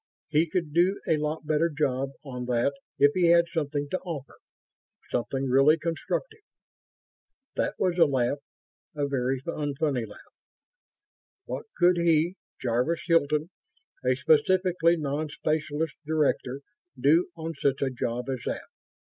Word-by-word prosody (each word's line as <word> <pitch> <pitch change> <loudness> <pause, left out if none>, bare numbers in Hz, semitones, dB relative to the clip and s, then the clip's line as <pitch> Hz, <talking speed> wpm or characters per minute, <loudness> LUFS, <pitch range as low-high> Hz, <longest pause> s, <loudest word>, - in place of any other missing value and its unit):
He 155 +2 +2
could 165 -4 -2
do 180 +4 +3
a 160 - +3
lot 150 +1 -3
better 155 +2 +2
job 140 -3 0 0.2
on 125 -2 -5
that 125 +3 +1 0.2
if 145 0 +6
he 180 -2 +3
had 170 0 +6
something 145 -2 -1
to 185 - 0
offer... 150 -8 -7 0.7
something 135 +2 -1
really 135 +5 +5
constructive.... 175 - -3 1.2
That - - -1
was 180 -2 0
a 165 - +8
laugh. 135 0 0 0.6
A 145 -1 0
very 135 -1 0
unfunny 145 -6 -1
laugh. 105 - -15 1.1
What - - -5
could 180 0 +5
he, 170 0 +3 0.3
Jarvis 125 +7 0
Hilton, 155 -1 +2 0.5
a 130 0 +3
specifically 170 +4 +3
non 150 0 -2
specialist 155 +1 -1
director, 145 -3 0 0.4
do 165 +6 +4
on 165 0 -4
such 140 -2 0
a 135 - 0
job 120 0 -3
as 130 -2 -2
that? - - -2
150 Hz, 135 wpm, -27 LUFS, 135-165 Hz, 1.2 s, a